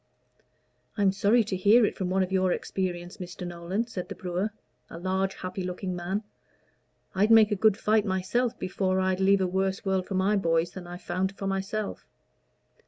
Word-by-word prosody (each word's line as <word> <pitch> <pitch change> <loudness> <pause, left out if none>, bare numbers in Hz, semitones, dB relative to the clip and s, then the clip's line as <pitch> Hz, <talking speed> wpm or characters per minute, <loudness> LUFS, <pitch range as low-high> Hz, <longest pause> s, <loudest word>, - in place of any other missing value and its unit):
"I 205 - +1
am 195 - +5
sorry 205 +4 +3
to 210 -2 -3
hear 215 +5 +5
it - - -2
from 185 -2 -2
one 190 +1 +2
of 185 - -4
your 185 -1 +2
experience, 175 -1 -3
Mr. 180 -1 -7
Nolan," 175 +5 -3
said 195 -6 -6
the - - -5
brewer, 180 +3 -2 0.4
a - - -8
large, 190 +2 -1
happy 185 +1 -5
looking 180 0 -4
man. 185 +4 -3 0.9
"I'd 200 +3 +2
make 225 -1 +7
a - - +2
good 210 0 +3
fight 215 0 +2
myself 220 +6 0
before 185 0 -1
I'd 185 0 +1
leave 195 0 +4
a - - +2
worse 190 +2 -1
world 190 -1 0
for 195 - -3
my 190 +3 +2
boys 165 -2 +1
than 180 -1 -9
I've 175 +1 -9
found 190 +2 -2
for 195 - -5
myself. 195 +2 -3
190 Hz, 190 wpm, -27 LUFS, 185-205 Hz, 0.9 s, make